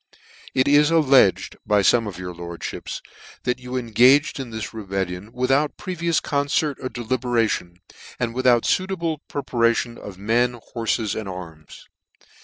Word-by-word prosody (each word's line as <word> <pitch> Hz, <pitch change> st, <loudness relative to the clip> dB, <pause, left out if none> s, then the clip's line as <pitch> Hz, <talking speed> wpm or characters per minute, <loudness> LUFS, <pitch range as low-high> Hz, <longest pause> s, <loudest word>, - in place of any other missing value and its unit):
{( -, -, -20 dB
It 130 Hz, +1 st, +3 dB
is 145 Hz, +1 st, +5 dB
alledged, 135 Hz, -, +4 dB
by 105 Hz, -1 st, +3 dB
fome 115 Hz, +2 st, +4 dB
of 100 Hz, -, -6 dB
your 90 Hz, -1 st, -6 dB
lordfhips, 85 Hz, 0 st, -6 dB, 0.4 s
that 125 Hz, 0 st, -1 dB
you 125 Hz, 0 st, -5 dB
engaged 125 Hz, +6 st, +4 dB
in 130 Hz, -3 st, -5 dB
this 110 Hz, 0 st, -6 dB
rebellion 95 Hz, -1 st, -4 dB
without 135 Hz, +4 st, +1 dB
previous 170 Hz, -3 st, -1 dB
concert 145 Hz, 0 st, 0 dB
or 130 Hz, -, -3 dB
deliberation, 120 Hz, -7 st, -1 dB, 0.4 s
and 120 Hz, -2 st, -1 dB
without 125 Hz, -2 st, +3 dB
fuitable 170 Hz, -5 st, 0 dB
pre 145 Hz, -, -4 dB
parations 115 Hz, 0 st, +1 dB
of 100 Hz, -3 st, -9 dB
men, 120 Hz, +4 st, +1 dB
horfes,'and 110 Hz, -3 st, -1 dB
arms. 85 Hz, -4 st, -10 dB
120 Hz, 140 wpm, -23 LUFS, 105-135 Hz, 0.4 s, is